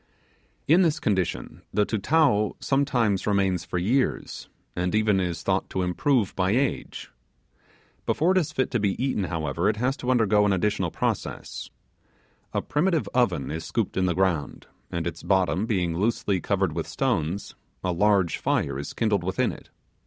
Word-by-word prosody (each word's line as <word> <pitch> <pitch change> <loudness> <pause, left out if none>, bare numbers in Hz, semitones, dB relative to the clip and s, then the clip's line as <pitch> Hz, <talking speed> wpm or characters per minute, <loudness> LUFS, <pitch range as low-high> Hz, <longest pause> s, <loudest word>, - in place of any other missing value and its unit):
In 165 +5 +6
this 165 -4 +2
condition 95 -6 -2
the 105 - +2
Tutao 105 -1 +2
sometimes 125 -9 +1
remains 95 -3 +1
for - - -3
years, 120 +10 -1 0.3
and 90 +3 -1
even 105 -2 +3
is 90 -2 -2
thought - - 0
to 95 - -1
improve 105 +5 +1
by 95 0 +1
age. 135 +3 -2 1.0
Before 165 +5 +2
it 190 - +4
is 155 -3 -2
fit 130 -3 -1
to 120 - +1
be 100 -2 +1
eaten, 130 -6 0
however, 85 +2 -1
it 105 - 0
has 125 +4 0
to 125 - -4
undergo 110 -4 +4
an 100 -1 +3
additional 100 +3 0
process. - - -3 0.8
A - - -1
primitive 165 +1 +1
oven 90 - +1
is 80 +1 -4
scooped 115 +1 -2
in 95 -1 +1
the 90 - 0
ground, 90 -7 -1 0.3
and 85 -2 -2
its 85 -2 -4
bottom 95 +2 +1
being 90 -7 0
loosely 100 -1 0
covered - - 0
with - - -3
stones, 80 +6 -1 0.3
a 90 - 0
large 95 -1 +2
fire 70 -1 0
is 70 - -6
kindled 105 -5 +1
within 95 +1 0
it. - - -12
100 Hz, 165 wpm, -25 LUFS, 90-120 Hz, 1.0 s, In